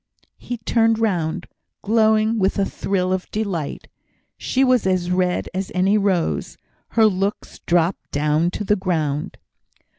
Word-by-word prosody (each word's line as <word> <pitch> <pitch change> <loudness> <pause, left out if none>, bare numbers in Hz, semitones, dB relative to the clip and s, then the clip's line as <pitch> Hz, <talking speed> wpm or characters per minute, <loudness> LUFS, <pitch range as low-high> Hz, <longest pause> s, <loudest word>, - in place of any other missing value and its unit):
He 245 - -5
turned 225 0 +2
round, 180 -8 -1 0.4
glowing 220 +1 +3
with 190 0 +1
a 200 - +2
thrill 185 -2 -1
of 185 -1 -3
delight. 195 -9 -3 0.5
She 265 - 0
was 255 -6 +3
as 180 -1 0
red 180 0 0
as 190 +1 -3
any 190 +3 +3
rose; 195 -5 0 0.4
her 225 - +7
looks 200 0 -1
dropped 175 +1 +1
down 150 +3 +1
to 210 - -4
the 210 +1 +2
ground. 160 -7 -2
190 Hz, 140 wpm, -21 LUFS, 175-215 Hz, 0.5 s, her